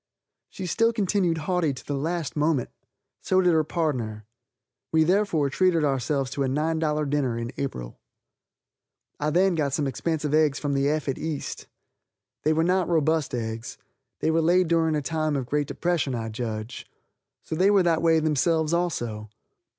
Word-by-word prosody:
She 190 - -7
still 230 +6 +2
continued 195 -6 +1
haughty 160 -2 0
to - - -11
the 145 - -3
last 160 +3 -2
moment. 150 -3 +1 0.5
So 185 - +2
did 180 -2 +4
her 160 -1 +3
pardner. 125 - -2 0.7
We 160 0 +4
therefore 170 -5 +1
treated 180 -1 +2
ourselves 135 -1 0
to 140 - -1
a - - 0
$9 150 +1 0
dinner 135 -5 0
in 115 +1 -4
April. 60 - -5 1.2
I 150 - 0
then 185 +4 +3
got 145 -4 -1
some 150 - 0
expensive 150 +2 -2
eggs 155 -3 +3
from 145 -2 -2
the 140 0 +1
effete 150 -3 -1
east. 155 -3 -5 0.7
They 155 - +2
were 160 +1 +2
not 180 +1 +1
robust 160 -4 +1
eggs. 115 0 -5 0.4
They 160 - +2
were 165 +1 +2
layed 175 +2 +3
during 165 -2 +2
a 150 - -1
time 155 0 -1
of 135 -3 -2
great 145 +3 -1
depression, 170 -7 -1
I 115 -1 -3
judge. 110 0 -5 0.6
So - - -6
they 185 +5 +3
were 200 -2 +4
that 165 -2 +2
way 165 -1 +4
themselves 160 +1 +1
also. 120 -12 -2
155 Hz, 165 wpm, -25 LUFS, 135-170 Hz, 1.2 s, did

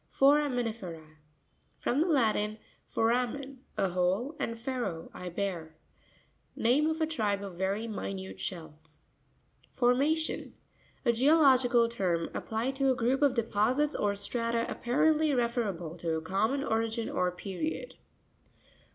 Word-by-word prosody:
Forami 280 -2 +4
NirE'RA.— 170 -9 -7 0.6
From 270 +5 0
the 340 - +2
Latin, 215 -8 +2 0.3
foramen, 250 +4 0 0.2
a 195 - +2
hole, 185 - 0
and 230 - -2
fero, 235 -9 -4
I 180 - -6
bear. 170 -4 -4 0.8
Name 265 +7 +3
of 320 0 -1
a - - +4
tribe 210 -10 -1
of 195 -2 -6
very 200 +4 -1
minute 95 - -5
shells. 155 - -7 0.7
Forma'rioy.—A 270 -1 -1
geological 255 -3 +5
term 180 -7 -1
ap - - -5
plied 230 +5 -1
to 270 -1 +2
a 260 - +3
group 250 +4 +1
of 280 -3 +4
deposits 235 +6 +1
or 200 -1 0
strata 230 +2 -1
apparently 300 +4 +2
referable 215 -9 -1
to 165 -1 -1
a - - -4
common 220 +11 0
origin 225 -1 -1
or 180 0 0
period. 200 - -4
230 Hz, 125 wpm, -30 LUFS, 190-265 Hz, 0.8 s, geological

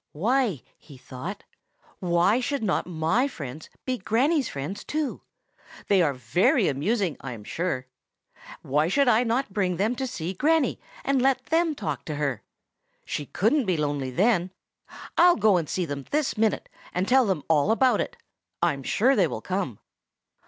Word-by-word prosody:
"Why," 220 - +1 0.2
he 140 -4 -15
thought,—"why 175 - -3
should 270 0 -2
not 190 -4 0
my 180 - +1
friends 150 - -8 0.2
be 255 -1 -2
Granny's 260 - +1
friends 145 +9 -5
too? 305 -2 -3 0.7
They 195 -2 +5
are 145 -5 +1
very 130 - +2
amusing, 180 - 0
I 135 -2 -5
am 110 -3 -10
sure. 145 - -2 0.8
Why 150 +4 +1
should 275 +9 +2
I 240 0 +5
not 235 -2 -1
bring 185 -4 0
them 215 +6 +1
to 265 - -2
see 180 -5 -4
Granny, 300 - +2 0.3
and 270 -1 +2
let 265 0 +2
them 325 -1 +1
talk 210 - -4
to 155 - -4
her? 140 -6 -2 0.6
She 145 - -4
couldn't 240 +7 +1
be 180 -3 +1
lonely 145 -3 -1
then. 185 - +2 0.7
I'll 350 +1 +7
go 210 -3 +4
and 165 -4 -2
see 185 - -1
them 140 -3 -5
this 300 -1 0
minute, 220 -1 0 0.3
and 180 +2 0
tell 260 -2 +4
them 180 -7 -1
all 160 +2 +3
about 240 0 +3
it. - - -5 0.4
I'm 140 - +1
sure 250 - +2
they 190 -5 +3
will - - -5
come." 185 - -3
195 Hz, 165 wpm, -26 LUFS, 155-250 Hz, 0.8 s, I'll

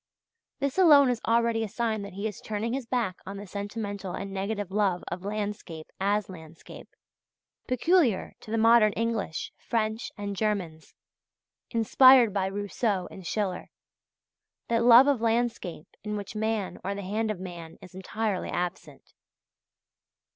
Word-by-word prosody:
This 280 +5 -2
alone 290 -7 +7
is 240 - -3
already 230 0 +2
a - - -2
sign 220 0 -2
that 200 -1 -8
he 200 +3 -5
is 210 - -8
turning 220 +2 -3
his 265 -3 -4
back 235 -8 -1
on 195 +1 -7
the 205 - -7
sentimental 200 -1 -5
and 195 0 -5
negative 200 0 -3
love 195 -3 +1
of 180 +1 -5
landscape 205 -6 -5
as 200 +1 +1
landscape, 165 -3 -12 0.8
peculiar 255 - +2
to - - -14
the 225 - -1
modern 225 -2 +5
English, 225 -7 -2
French, 220 0 -2
and 200 -1 -4
Germans, 185 -7 -3 0.7
inspired 240 0 +6
by 195 -2 0
Rousseau 205 0 -2
and 185 -3 -9
Schiller 195 -4 -2 1.0
that 230 0 +2
love 240 +2 +8
of 280 -5 +1
landscape 230 -8 -1
in 210 0 -3
which 205 +1 -7
man 220 -2 -2
or 200 +1 -2
the 200 - -6
hand 215 +4 -1
of 210 -4 -3
man 170 -3 -8
is 180 - -14
entirely 195 +1 -3
absent. 180 0 -5
210 Hz, 145 wpm, -27 LUFS, 190-230 Hz, 1.0 s, love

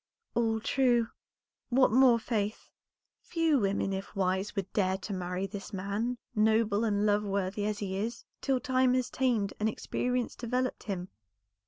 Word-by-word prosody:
"All 225 -1 +1
true; 240 -1 +2 0.6
what 255 -1 +4
more, 250 0 +6
Faith?" 215 -2 -3 0.5
"Few 325 -4 +2
women, 195 -1 0
if 190 0 -5
wise, 190 +1 0
would 195 -2 -3
dare 190 -2 +2
to 200 +2 -6
marry 180 0 -2
this 195 +1 -7
man, 205 +5 -2 0.2
noble 220 -1 +3
and 210 -2 +1
love 210 0 +3
worthy 200 0 -1
as 210 -1 -1
he 195 -2 -3
is, 230 +4 -3 0.2
till 265 -2 +1
time 255 +1 +2
has 255 -1 0
tamed 235 -7 +1
and 215 +1 +2
experience 250 +2 -2
developed 250 +1 -2
him. 185 -3 -4
215 Hz, 155 wpm, -30 LUFS, 195-245 Hz, 0.6 s, more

